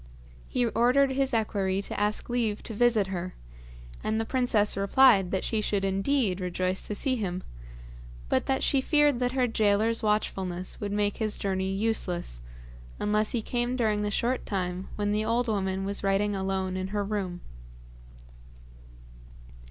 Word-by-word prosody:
He 245 - 0
ordered 250 +4 +3
his 270 0 +1
equerry 200 -4 0
to - - -5
ask 210 +1 0
leave 230 -4 -1
to 225 - -7
visit 225 -2 +3
her, 180 0 -4 0.7
and 220 +1 0
the 225 - -1
princess 230 -5 +1
replied 200 -1 +5
that 190 - -1
she 220 -2 0
should 200 -2 0
indeed 195 0 +1
rejoice 185 +1 -1
to 210 - -3
see 260 +4 0
him, 185 -4 -3 0.8
but - - 0
that 265 0 +1
she 275 - +3
feared 295 -2 +3
that 250 0 0
her 260 -1 +2
gaoler's 220 0 +2
watchfulness 190 -4 -1
would 205 -1 -3
make 205 0 0
his 215 -2 -1
journey 190 -1 -1
useless, 195 - -1 0.6
unless 210 +1 +1
he 230 -3 -1
came 240 +1 -1
during 215 -4 +1
the 210 - 0
short 240 +5 0
time 185 -1 -2
when 205 0 -1
the 210 +1 +1
old 235 +2 +1
woman 195 -3 -1
was 200 +1 -3
writing 200 +1 +1
alone 190 -1 -1
in 185 0 -2
her 205 +1 -2
own 200 - -4
room. 185 -4 -3
210 Hz, 160 wpm, -28 LUFS, 195-235 Hz, 0.8 s, replied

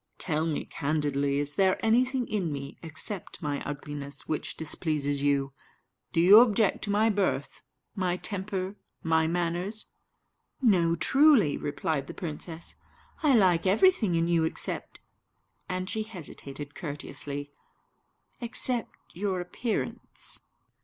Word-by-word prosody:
Tell 160 -1 -1
me 155 - -2
candidly, 145 -1 -1
is 145 0 0
there 190 +2 +3
anything 250 +2 +2
in 190 -7 -1
me, 140 0 -6
except 165 +4 -4
my 145 -3 -3
ugliness, 145 0 -6
which 155 - -3
displeases 150 -3 -1
you? 140 -1 +1 0.6
Do - - 0
you 190 +6 +9
object 220 -4 +3
to - - -6
my 215 +2 +3
birth, 200 -1 -1 0.3
my 185 -3 -1
temper, 195 0 -4 0.3
my 160 -1 +2
manners?" 175 +5 -2 0.7
"No, 180 -9 +3
truly," 270 - +5
replied 145 -1 -2
the - - -8
princess; 165 0 -5 0.5
"I 295 -5 +4
like 185 -5 +4
everything 215 - +4
in 165 0 +1
you, 170 -1 +2
except" 160 - -1 0.7
and 185 0 -2
she 220 - -2
hesitated 145 -8 -8
courteously 145 -3 -5 0.9
"except 240 0 +4 0.2
your 190 0 -2
appearance." 210 +6 -3
175 Hz, 120 wpm, -28 LUFS, 150-205 Hz, 0.9 s, you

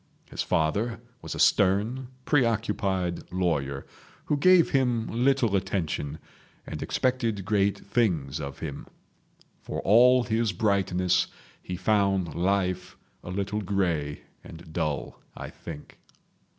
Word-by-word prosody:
His - - -3
father 105 +10 0 0.2
was - - -6
a - - -6
stern, 105 +6 +3 0.2
preoccupied 105 - 0
lawyer, 70 -7 -1 0.4
who 150 - +1
gave 180 +3 +5
him 125 -4 +2
little 120 -2 +2
attention, 85 -6 -2 0.5
and - - -6
expected 115 -6 0
great 100 0 +2
things 85 - 0
of 70 -1 -6
him. 75 -4 -6 0.7
For - - -5
all 125 +4 +6
his 115 -2 0
brightness 95 -2 +1 0.3
he 90 - -5
found 100 -4 +1
life 90 +1 -1 0.3
a - - -8
little 100 +3 -2
grey 85 -7 -1 0.2
and 80 -1 -12
dull 75 -4 -3 0.2
I - - -7
think. 75 -3 -10
100 Hz, 115 wpm, -27 LUFS, 85-115 Hz, 0.7 s, all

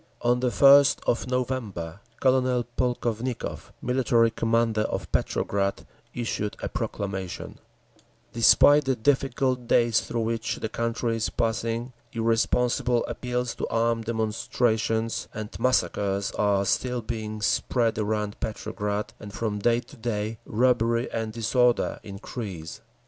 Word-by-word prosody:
On 120 +1 +3
the 125 0 +1
first 140 +2 +6
of 120 - 0
November 115 -9 -3 0.2
Colonel 130 -2 +2
Polkovnikov, 120 -1 -2
Military 120 -2 +3
Commander 115 -1 +1
of - - -3
Petrograd, 100 -1 -1 0.3
issued 115 -3 -3
a - - -3
proclamation: 95 -3 -4 0.7
Despite 145 +5 +6
the 135 -1 +1
difficult 130 0 +1
days 115 -2 +4
through 115 - -3
which 115 0 -1
the 110 - -4
country 115 0 -1
is 115 - -1
passing, 115 +1 -2 0.2
irresponsible 120 +1 +1
appeals 125 -1 -3
to - - -4
armed 115 0 0
demonstrations 110 0 0
and 110 0 -6
massacres 100 -6 +1
are 100 -1 +1
still 125 +3 0
being 110 -2 -4
spread 115 +1 +1
around 105 -1 -2
Petrograd, 105 -1 -3
and 105 - -9
from 105 -1 -2
day 120 +3 +2
to - - -16
day 110 -1 -3
robbery 120 0 +2
and 110 -1 -2
disorder 120 +2 +1
increase. 100 -4 -7
115 Hz, 120 wpm, -26 LUFS, 110-125 Hz, 0.7 s, first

